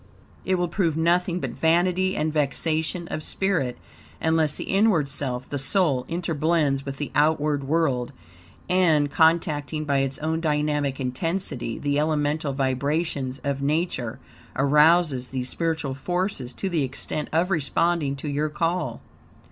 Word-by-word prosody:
It 190 - +2
will 175 -1 0
prove 170 -3 0
nothing 175 +2 +2
but - - -3
vanity 180 +3 +2
and 155 0 0
vexation 160 +3 0
of - - -3
spirit 160 -9 -1 0.4
unless 160 -2 +2
the - - -5
inward 195 -7 +2
self, 130 -2 -2
the 145 - -3
soul, 135 -3 +2
interblends 160 -4 0
with 135 -1 -5
the 145 - -4
outward 150 -1 +2
Word, 135 -5 0 0.6
and 160 -6 +3
contacting 155 -1 +2
by 140 -2 +1
its 135 0 -1
own 160 +1 -1
dynamic 150 -3 0
intensity 135 -2 -2
the 145 0 0
elemental 150 -1 0
vibrations 135 +1 -1
of 140 -1 -2
Nature 145 -5 -1 0.4
arouses 150 -1 +4
these 130 -1 -3
spiritual 160 -5 -2
forces 175 -2 -2
to 195 - -3
the 170 -4 0
extent 140 +3 -3
of 170 +4 +1
responding 160 -2 +1
to 140 +2 -6
your 145 +2 -1
call. 165 +4 -2
150 Hz, 140 wpm, -24 LUFS, 140-170 Hz, 0.6 s, arouses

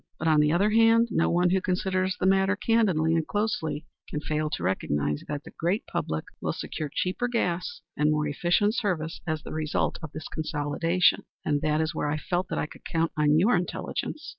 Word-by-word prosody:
But, 160 - -2
on 155 -1 +5
the 150 0 +4
other 195 +6 +3
hand, 230 +1 +5
no 165 - +2
one 175 +1 +3
who 190 0 +2
considers 185 0 0
the - - 0
matter 195 +1 +3
candidly 195 -8 +2
and 165 -1 +1
closely 165 -8 -1 0.2
can 150 - -3
fail 155 +1 -1
to 120 - -4
recognize 75 -5 -1
that 145 -1 -4
the - - -11
great 180 +7 0
public 80 0 -3 0.2
will - - -1
secure 155 -2 -5
cheaper 185 +10 -1
gas 180 -7 -1
and 150 0 +2
more 150 0 +1
efficient 175 +8 +2
service 170 -8 -2
as 155 -1 -2
the - - -7
result 155 -1 -1
of 160 -3 -7
the 155 - -7
consolidation. 160 +3 +1 0.2
And 145 -1 +1
there 155 0 +1
is 160 +1 0
where 150 - -1
I 150 - 0
felt 180 +4 -2
that - - -3
I - - 0
could - - -13
count 165 0 0
on 150 0 +3
your 200 +9 +4
intelligence. 240 - -3
165 Hz, 205 wpm, -27 LUFS, 150-190 Hz, 0.2 s, on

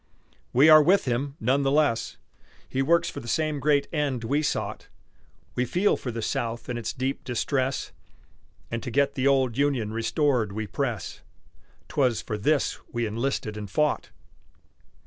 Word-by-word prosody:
We 135 +5 +5
are 155 -1 +9
with 185 +7 +4
him 135 +3 -1
none 130 +5 +2
the 135 - +1
less 145 -5 +1 0.5
He 130 - -1
works 170 +5 +3
for - - -5
the 120 - -10
same 155 +3 0
great 140 0 +2
end 140 -6 -1
we 140 +6 +1
sought; 150 - -3 0.7
We 125 - 0
feel 180 - +2
for 125 - -6
the 115 -1 -4
South 120 -3 -3
in 125 - -2
its 115 -2 -3
deep 130 +2 -3
distress, 130 +2 -1 0.8
And 115 0 -2
to - - -5
get 140 +3 +2
the 135 0 0
old 130 -3 +2
Union 130 -7 +1
restored 115 -2 +1
we 110 +1 -3
press 115 -2 -3 0.7
'Twas 125 -6 +1
for 105 - -3
this 145 +6 +1
we 120 -1 -1
enlisted 115 0 -2
and 105 -2 -6
fought. 150 +9 0
130 Hz, 165 wpm, -26 LUFS, 115-145 Hz, 0.8 s, are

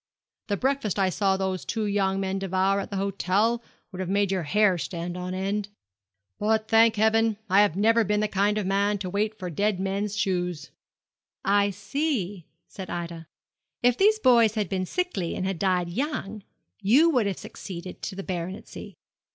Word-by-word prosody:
The 205 -1 -1
breakfast 265 -6 0
I 195 -1 +2
saw 195 +1 +1
those 190 -1 -2
two 220 -2 -2
young 195 -1 +1
men 195 0 -2
devour 190 +1 +1
at - - -5
the 200 - -5
hotel 200 +4 +1 0.3
would 185 - -8
have 185 -1 -3
made 200 0 +1
your 190 -2 0
hair 190 +3 +2
stand 175 0 -4
on 180 +1 -4
end. 200 +2 -2 0.7
But, 220 +1 +1
thank 225 0 +5
heaven, 220 0 +3
I 195 +2 +6
have 205 -6 +2
never 225 +3 +4
been 210 0 0
the 215 - +1
kind 205 +1 +1
of 210 - -1
man 200 +2 +1
to 185 -2 -5
wait 210 +2 -1
for 180 -3 -5
dead 200 +3 0
men's 200 +2 -2
shoes.' 180 -5 -2 0.7
'I 200 0 +3
see,' 200 - -3 0.2
said 190 -2 -9
Ida. 170 -2 -5 0.6
'If 245 -1 +4
these 425 - +4
boys 235 - +4
had 210 -5 -1
been 185 -1 -2
sickly 355 - -2
and 185 - -2
had 190 -3 -2
died 180 -3 +1
young, 215 - -3 0.4
you 260 +12 +5
would 245 -8 +2
have 195 - -2
succeeded 180 -1 -8
to 195 - -5
the 195 - -5
baronetcy.' 185 0 -6
200 Hz, 180 wpm, -26 LUFS, 185-215 Hz, 0.7 s, I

